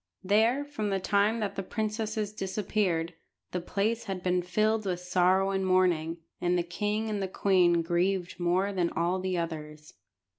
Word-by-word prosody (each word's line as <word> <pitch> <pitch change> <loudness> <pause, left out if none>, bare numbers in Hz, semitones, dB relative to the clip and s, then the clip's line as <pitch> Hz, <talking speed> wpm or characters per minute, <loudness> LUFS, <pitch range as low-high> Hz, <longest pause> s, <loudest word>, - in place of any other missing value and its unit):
There, 225 +8 +3
from 285 -8 -3
the 195 -1 0
time 205 +4 +2
that 200 -2 -2
the - - -2
princesses 215 +1 -3
disappeared, 190 -4 -1 0.4
the 180 - -2
place 205 +6 -1
had 190 -2 -4
been 180 0 +2
filled 215 +5 +1
with 180 -3 -2
sorrow 185 +2 +2
and 195 0 0
mourning, 180 -3 +2 0.2
and 175 0 +2
the 175 - +1
king 210 +5 -2
and 210 -2 -2
the 190 - -1
queen 180 -3 +3
grieved 175 +1 0
more 185 +3 +1
than 175 -3 +1
all 175 +3 0
the 185 -1 -1
others. 150 -2 -5
190 Hz, 170 wpm, -29 LUFS, 175-210 Hz, 0.4 s, There